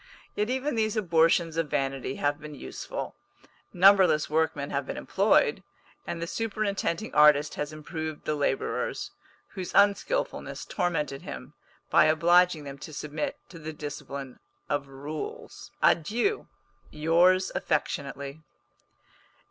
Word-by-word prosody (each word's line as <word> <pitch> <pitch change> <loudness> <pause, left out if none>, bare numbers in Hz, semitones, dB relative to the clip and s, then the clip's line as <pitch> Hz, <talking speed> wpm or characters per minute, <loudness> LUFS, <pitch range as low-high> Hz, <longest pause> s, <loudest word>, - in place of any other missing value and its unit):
Yet 210 +2 -1
even 265 +3 -1
these 220 -1 0
abortions 165 -3 +3
of 165 -2 0
vanity 135 -2 -2
have 145 +1 0
been 150 -1 -9
useful. - - -6 0.6
Numberless 185 -5 +5
workmen 155 -3 0
have 140 -1 -2
been - - -4
employed, - - +2 0.5
and 170 - -3
the 170 - -2
superintending 210 -1 -2
artist 150 0 +5
has 150 +1 -4
improved 155 0 -6
the 155 - 0
labourers, 400 - -1 0.4
whose 185 -2 -6
unskilfulness 205 - +1
tormented 150 -7 -2
him, 135 -5 -8 0.4
by - - +6
obliging 170 +1 +4
them 140 -1 -8
to 155 - -9
submit 150 0 -4
to 170 - -11
the 160 0 -6
discipline 140 -3 -7 0.3
of 145 -1 -1
rules. 145 +3 -7
Adieu! 240 - +2 0.4
Yours 175 +4 +3
affectionately. 140 -1 -2
155 Hz, 120 wpm, -28 LUFS, 145-185 Hz, 0.6 s, by